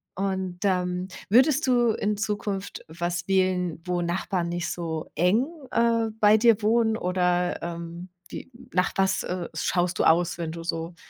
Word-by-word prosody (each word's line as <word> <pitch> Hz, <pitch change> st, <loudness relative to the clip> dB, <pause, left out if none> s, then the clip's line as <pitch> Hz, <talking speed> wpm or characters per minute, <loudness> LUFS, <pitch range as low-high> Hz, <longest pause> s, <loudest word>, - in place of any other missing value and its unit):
Und, 190 Hz, -2 st, -2 dB
ähm, 180 Hz, -1 st, 0 dB, 0.2 s
würdest 265 Hz, +6 st, +4 dB
du 240 Hz, -2 st, +3 dB
in 210 Hz, -1 st, -1 dB
Zukunft 205 Hz, -2 st, -3 dB
was 175 Hz, +1 st, -3 dB
wählen, 185 Hz, -3 st, +1 dB
wo 180 Hz, -1 st, -1 dB
Nachbarn 175 Hz, 0 st, -1 dB
nicht 175 Hz, 0 st, -2 dB
so 160 Hz, -2 st, -4 dB
eng, 205 Hz, -, +2 dB, 0.2 s
äh, 230 Hz, -1 st, +2 dB
bei 210 Hz, 0 st, +6 dB
dir 225 Hz, -1 st, +4 dB
wohnen 220 Hz, +1 st, +2 dB
oder, 180 Hz, -2 st, 0 dB
ähm, 170 Hz, +1 st, -6 dB, 0.2 s
wie 260 Hz, -, -9 dB, 0.2 s
nach 180 Hz, 0 st, +2 dB
was, 190 Hz, 0 st, +2 dB
äh, 180 Hz, -1 st, -4 dB
schaust 175 Hz, +2 st, 0 dB
du -, -, +3 dB
aus, 170 Hz, +1 st, +3 dB
wenn 165 Hz, -2 st, -4 dB
du 165 Hz, 0 st, -7 dB
so 165 Hz, 0 st, -4 dB
180 Hz, 155 wpm, -26 LUFS, 175-210 Hz, 0.2 s, bei